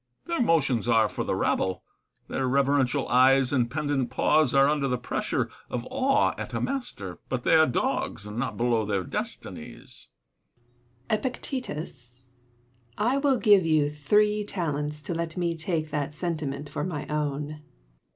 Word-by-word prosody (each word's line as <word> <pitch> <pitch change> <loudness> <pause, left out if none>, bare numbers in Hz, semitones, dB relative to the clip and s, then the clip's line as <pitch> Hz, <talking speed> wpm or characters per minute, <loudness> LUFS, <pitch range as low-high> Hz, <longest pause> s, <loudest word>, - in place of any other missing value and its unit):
Their 335 -5 -1
motions 140 - +2
are 110 -2 +5
for - - -4
the - - -1
rabble; 95 -1 0 0.4
their 130 - -1
reverential 135 0 +2
eyes 130 +1 +4
and 120 -3 +2
pendant 140 -2 -1
paws 150 +2 +3
are 135 +1 +5
under 145 -1 +1
the 125 -1 0
pressure 120 - -2 0.2
of 120 0 -4
awe 275 +1 +2
at - - -5
a - - 0
master; 170 - -4
but 125 -2 -2
they - - +3
are 160 -1 +6
dogs, 110 -4 -1
and 105 0 -7
not 125 - -3
below 120 -2 +2
their 100 -3 -1
destinies. - - -7 1.0
Seneca. 215 - 0
Epictetus? 155 - -6 0.8
I 240 +6 +2
will 275 -2 +3
give 205 -5 +5
you 155 -3 +2
three 210 +8 +2
talents 150 -6 -3
to 150 - -4
let 165 0 -3
me 170 -2 0
take 160 -2 -2
that 145 0 -2
sentiment 150 -4 -3
for - - -4
my 160 -5 -3
own. 150 0 -3
145 Hz, 155 wpm, -27 LUFS, 130-170 Hz, 1.0 s, are